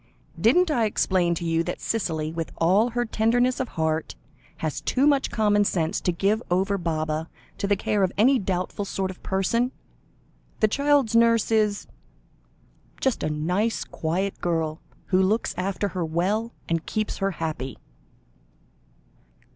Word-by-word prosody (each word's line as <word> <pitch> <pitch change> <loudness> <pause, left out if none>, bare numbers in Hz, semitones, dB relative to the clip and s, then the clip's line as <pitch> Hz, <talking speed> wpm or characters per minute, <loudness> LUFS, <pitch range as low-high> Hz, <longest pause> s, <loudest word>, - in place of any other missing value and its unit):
"Didn't 315 - +4
I 235 -6 +2
explain 185 -4 +1
to 170 - -4
you 165 0 +1
that - - -4
Cicely, 160 -8 -2
with 165 -1 -4
all 195 +8 +3
her 240 +1 -1
tenderness 240 +3 +1
of 260 - -2
heart, 160 - -1 0.4
has 155 -2 -3
too 265 +2 +1
much 285 -2 +3
common 205 -2 +3
sense 165 -5 0
to 180 - +1
give 200 +6 +1
over 195 +3 +1
Baba 155 -1 -2 0.3
to 200 - -1
the 205 - +3
care 205 +1 0
of 185 -2 +2
any 255 +5 +5
doubtful 185 +1 -2
sort 190 -1 -2
of 185 - -14
person? 230 +6 0 0.9
The 215 - +4
child's 280 -1 +2
nurse 230 -1 +4
is 210 -2 +2 1.1
just 265 -4 0
a - - 0
nice, 180 +9 0
quiet 185 +5 -3
girl, 160 -2 -1 0.2
who 185 -1 +2
looks 210 +5 +1
after 195 +2 -1
her 180 -2 -3
well 190 +8 -1 0.2
and 165 -1 -1
keeps 215 -1 -2
her 195 -1 0
happy." 155 -5 -4
195 Hz, 150 wpm, -25 LUFS, 165-225 Hz, 1.1 s, any